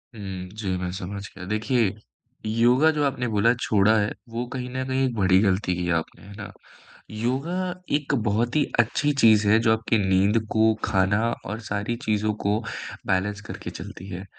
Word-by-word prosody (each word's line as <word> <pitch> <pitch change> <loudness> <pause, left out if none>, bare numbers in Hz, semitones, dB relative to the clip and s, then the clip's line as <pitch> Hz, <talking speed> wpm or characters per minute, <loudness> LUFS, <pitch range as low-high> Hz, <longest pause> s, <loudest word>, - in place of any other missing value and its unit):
हुँ, 95 -3 -6
जी, 105 0 -5
मैं 90 0 -3
समझ 100 +1 -5
गया। 90 -1 -8
देखिए, 110 -1 +1 0.5
योगा 120 +7 +4
जो 150 -1 -1
आपने 125 -3 0
बोला 110 +2 +3
छोड़ा 105 0 +3
है, 105 0 0 0.2
वो 115 +2 -3
कहीं 125 -1 -4
न 130 +1 -3
कहीं 130 0 +1
एक 125 - -1
बड़ी 95 -2 +4
गलती 95 -2 +1
की 90 0 -2
आपने, 80 - -11
है 100 - -11
ना? 105 - -7 0.6
योगा 130 +10 -2 0.4
एक 145 -1 -1
बहुत 115 +5 0
ही 150 - +4 0.2
अच्छी 145 +6 +2
चीज़ 110 -2 +6
है, 105 +2 +6
जो 115 -1 +3
आपकी 110 0 +1
नींद 100 +2 +3
को, 110 0 +4
खाना 100 0 +2 0.2
और 105 +3 -4
सारी 105 +3 -2
चीज़ों 105 0 +1
को 105 +2 +2 0.5
बैलेंस 100 +2 0
करके - - -6
चलती 95 - -9
है। 95 +1 -6
110 Hz, 180 wpm, -24 LUFS, 100-120 Hz, 0.6 s, चीज़